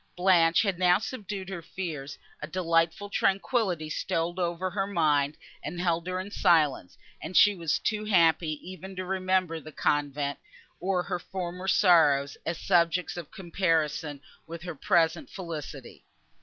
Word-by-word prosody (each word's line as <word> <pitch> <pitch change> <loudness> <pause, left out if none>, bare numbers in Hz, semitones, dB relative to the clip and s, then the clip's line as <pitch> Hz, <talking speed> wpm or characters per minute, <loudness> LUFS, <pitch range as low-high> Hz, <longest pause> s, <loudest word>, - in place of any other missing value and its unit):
Blanche 175 -2 +4
had 195 -4 -1
now 180 -1 +5
subdued 205 -4 -6
her 185 -3 -5
fears; 155 -5 -6 0.2
a 150 - -4
delightful 165 +2 0
tranquillity 195 -4 0
stole 165 +3 -2
over 175 +1 -1
her 195 +1 -1
mind, 150 -6 +1 0.3
and 175 - -5
held 170 -1 0
her 185 0 -2
in 190 +2 -6
silence; 155 - +2 0.2
and 175 +4 -2
she 205 - +7
was 165 -5 -1
too 215 -1 -2
happy 165 -5 +3
even 185 +1 -9
to 185 0 -4
remember 185 -3 0
the 155 0 -11
convent, 145 -1 -1 0.4
or 185 -1 0
her 180 -1 -3
former 180 +1 -6
sorrows, 150 -8 +4
as 165 0 -1
subjects 175 -1 +1
of 175 -4 -7
comparison 165 -5 -1 0.3
with 165 0 -8
her 175 -1 -5
present 165 +1 +1
felicity. 155 -8 -8
175 Hz, 145 wpm, -28 LUFS, 160-185 Hz, 0.4 s, she